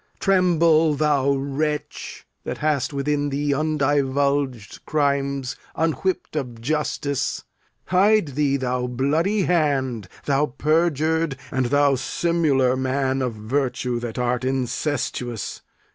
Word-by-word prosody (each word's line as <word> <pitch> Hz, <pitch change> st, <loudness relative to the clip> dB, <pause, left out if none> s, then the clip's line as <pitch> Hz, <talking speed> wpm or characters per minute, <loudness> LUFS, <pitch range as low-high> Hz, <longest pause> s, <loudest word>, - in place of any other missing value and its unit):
Tremble, 170 Hz, -5 st, +3 dB
thou 140 Hz, -2 st, +2 dB
wretch, 140 Hz, +2 st, -3 dB, 0.2 s
That -, -, -4 dB
hast 150 Hz, -3 st, 0 dB
within 145 Hz, +1 st, -1 dB
thee 145 Hz, +1 st, 0 dB
undivulged 140 Hz, -4 st, 0 dB
crimes 140 Hz, -3 st, 0 dB, 0.2 s
Unwhipp'd 165 Hz, +3 st, -1 dB
of 125 Hz, -6 st, -4 dB
justice. 145 Hz, +1 st, -1 dB, 0.4 s
Hide 200 Hz, -1 st, +3 dB
thee, 140 Hz, 0 st, +1 dB
thou 125 Hz, -1 st, -1 dB
bloody 155 Hz, -, +1 dB
hand; 135 Hz, -, 0 dB, 0.2 s
Thou 145 Hz, +1 st, +2 dB
perjur'd, 160 Hz, -1 st, +1 dB
and 130 Hz, -2 st, 0 dB
thou 145 Hz, +1 st, +3 dB
simular 135 Hz, -2 st, +1 dB
man 130 Hz, 0 st, 0 dB
of 125 Hz, -3 st, -2 dB
virtue 125 Hz, +2 st, -1 dB
That 120 Hz, -1 st, -6 dB
art 125 Hz, 0 st, 0 dB
incestuous. 125 Hz, -2 st, -2 dB
140 Hz, 105 wpm, -23 LUFS, 130-155 Hz, 0.4 s, Tremble